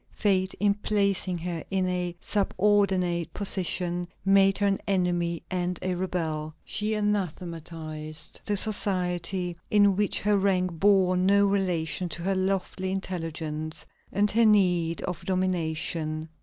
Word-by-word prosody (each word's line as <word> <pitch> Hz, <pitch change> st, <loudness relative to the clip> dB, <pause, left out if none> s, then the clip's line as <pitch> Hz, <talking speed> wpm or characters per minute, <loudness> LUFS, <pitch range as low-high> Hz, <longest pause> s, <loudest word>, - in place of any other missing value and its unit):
Fate, 190 Hz, -2 st, 0 dB
in 205 Hz, 0 st, +2 dB
placing 200 Hz, -3 st, +1 dB
her 170 Hz, -1 st, -4 dB
in 190 Hz, -1 st, 0 dB
a 180 Hz, -1 st, -2 dB
subordinate 190 Hz, -4 st, +1 dB
position, 180 Hz, -3 st, -1 dB, 0.2 s
made 195 Hz, 0 st, +5 dB
her 205 Hz, -, +1 dB
an 195 Hz, -1 st, +2 dB
enemy 175 Hz, -3 st, 0 dB
and 180 Hz, -1 st, -1 dB
a 185 Hz, -, 0 dB
rebel. 160 Hz, -4 st, -3 dB
She 215 Hz, +1 st, -1 dB
anathematized 165 Hz, -6 st, -3 dB
the 205 Hz, -, -1 dB
society 180 Hz, -3 st, 0 dB
in 205 Hz, -2 st, +4 dB
which 205 Hz, 0 st, 0 dB
her 205 Hz, 0 st, +3 dB
rank 185 Hz, -2 st, +1 dB
bore 190 Hz, -2 st, +4 dB
no 200 Hz, +2 st, +4 dB
relation 180 Hz, -4 st, 0 dB
to 170 Hz, +2 st, -5 dB
her 195 Hz, +2 st, +1 dB
lofty 190 Hz, 0 st, -1 dB
intelligence 160 Hz, -4 st, -3 dB, 0.3 s
and 205 Hz, +1 st, +1 dB
her 230 Hz, +2 st, +3 dB
need 180 Hz, -6 st, +3 dB
of 175 Hz, -2 st, -4 dB
domination. 160 Hz, -3 st, -1 dB
185 Hz, 130 wpm, -27 LUFS, 170-195 Hz, 0.3 s, made